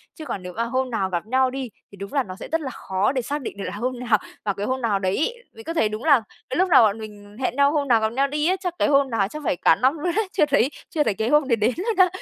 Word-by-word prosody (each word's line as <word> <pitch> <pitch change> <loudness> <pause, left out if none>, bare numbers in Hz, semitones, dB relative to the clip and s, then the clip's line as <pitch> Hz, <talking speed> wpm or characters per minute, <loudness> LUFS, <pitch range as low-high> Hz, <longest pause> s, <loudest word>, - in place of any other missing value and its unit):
chứ 315 - -9
còn 200 -8 -5
nếu 180 0 -7
mà 230 - -1
hôm 255 +2 -1
nào 205 -5 -1
gặp 175 0 -2
nhau 260 +3 +2
đi, 265 -1 -4 0.2
thì - - -12
đúng 200 +6 -8
là 275 -2 +2
nó 185 -5 -8
sẽ - - -9
rất 325 0 +1
là 275 - -4
khó 190 -4 -1
để 265 -2 -1
xác 290 +5 -3
định 230 - -6
được 200 - -5
là - - -4
hôm 245 +3 -3
nào, 240 -3 +2 0.3
vào 200 - +1
cái 200 +1 -4
hôm 260 +3 -2
nào 215 -4 +1
đấy 190 0 0
ấy. 470 +11 0 0.2
Mình 455 - -12
có 330 - -4
thấy 225 -10 +2
đúng 215 +2 -6
là 285 -6 +5 0.3
cái 260 - -2
lúc 370 +1 +2
nào 285 - +7
bọn 215 0 +2
mình 205 -1 -11
hẹn 255 -1 -1
nhau 280 +1 +4
hôm 295 -2 0
nào 235 -3 +5
gặp 220 - +1
nhau 275 +3 +2
đi 300 +2 -1
á, 370 - +3
chắc 360 -2 -3
cái - - +3
hôm 280 -2 +3
nào 225 -5 +1
chắc 305 +9 -8
phải - - +1
cả 165 - +4
năm 260 - +2
luôn 345 +4 -1
đấy, 435 -1 +1
chưa 305 - +3
thấy 280 -3 +2 0.2
chưa 305 - +1
thấy 220 - +1
cái 220 +4 -2
hôm 295 -1 +3
đấy 240 - +3
đến 225 +3 +1
luôn 430 +5 -1
á. 370 -1 +7
255 Hz, 335 wpm, -23 LUFS, 215-295 Hz, 0.3 s, nào